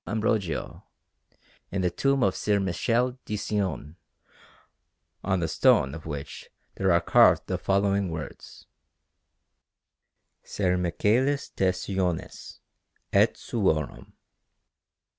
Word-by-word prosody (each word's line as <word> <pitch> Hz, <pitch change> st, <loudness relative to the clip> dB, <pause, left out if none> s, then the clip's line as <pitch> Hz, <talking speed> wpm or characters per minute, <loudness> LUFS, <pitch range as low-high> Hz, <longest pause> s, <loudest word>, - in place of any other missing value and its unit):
Ambrogio, 105 Hz, -6 st, -2 dB, 0.9 s
in 95 Hz, 0 st, -1 dB
the 90 Hz, -, +1 dB
tomb 135 Hz, +6 st, +1 dB
of 95 Hz, -, +2 dB
Ser 105 Hz, -1 st, +1 dB
Michele 120 Hz, +7 st, 0 dB
di 105 Hz, -, -4 dB
Cione, 95 Hz, -6 st, -3 dB, 1.3 s
on 95 Hz, -2 st, 0 dB
the 80 Hz, -, 0 dB
stone 70 Hz, -3 st, +3 dB
of 80 Hz, 0 st, -9 dB
which 70 Hz, -3 st, -7 dB, 0.2 s
there 95 Hz, -1 st, +1 dB
are 85 Hz, -, +5 dB
carved 85 Hz, -, +4 dB
the -, -, -2 dB
following 100 Hz, -1 st, +1 dB
words: 80 Hz, -3 st, -8 dB, 1.8 s
SER 90 Hz, -3 st, -1 dB
MICHÆLIS 110 Hz, +11 st, 0 dB
DE 95 Hz, -1 st, +2 dB
CIONIS, 90 Hz, -2 st, -4 dB, 0.5 s
ET -, -, +4 dB
SUORUM. 80 Hz, -10 st, -2 dB
95 Hz, 105 wpm, -26 LUFS, 85-105 Hz, 1.8 s, are